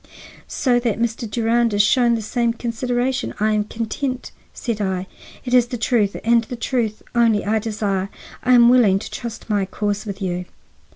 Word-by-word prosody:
"So 245 -3 +1
that 235 -4 -1
Mr. 230 0 -2
Durand 230 0 +1
is 205 - +5
shown 240 +2 +3
the 225 - -3
same 235 +2 0
consideration, 245 +3 -2
I 215 +1 +2
am 210 -1 +1
content," 250 +4 -4 0.2
said 230 -4 -4
I. 190 -2 -1 0.4
"It 245 - -3
is 245 -1 +5
the 245 - -4
truth 225 -4 +1
and 235 0 +4
the 245 - -6
truth 230 -2 -2
only 230 -3 +3
I 220 +2 +1
desire. 205 -3 -2 0.3
I 255 - +3
am 240 -1 +7
willing 240 -6 +5
to 195 - -7
trust 235 -2 -7
my 205 -3 +1
cause 205 +2 -3
with 200 -1 -5
you." 180 -2 -3
230 Hz, 180 wpm, -21 LUFS, 210-240 Hz, 0.4 s, am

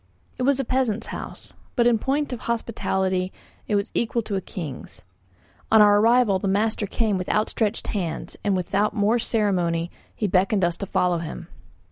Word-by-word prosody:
It - - -2
was 275 +1 +2
a 270 - -1
peasant's 235 -4 +1
house, - - -7 0.2
but 240 - +3
in 235 -2 +4
point 280 +3 -1
of 245 - -5
hospitality 190 -5 -1 0.4
it 210 - +1
was 200 +1 -1
equal 235 0 0
to 205 - -3
a 190 - -1
king's. 155 -8 -8 0.7
On 220 - +7
our 205 -1 +7
arrival 225 -3 +4
the 195 - -2
master 210 +2 +1
came 210 -2 0
with 180 - -4
outstretched 215 0 0
hands, 175 -6 -3
and 200 -2 +1
without 195 +4 0
more 215 +3 +2
ceremony 180 -7 0 0.2
he 215 - -2
beckoned 195 +1 +2
us 175 -1 0
to 200 - -5
follow 180 -2 +1
him. 165 +1 -7
205 Hz, 175 wpm, -24 LUFS, 185-230 Hz, 0.7 s, On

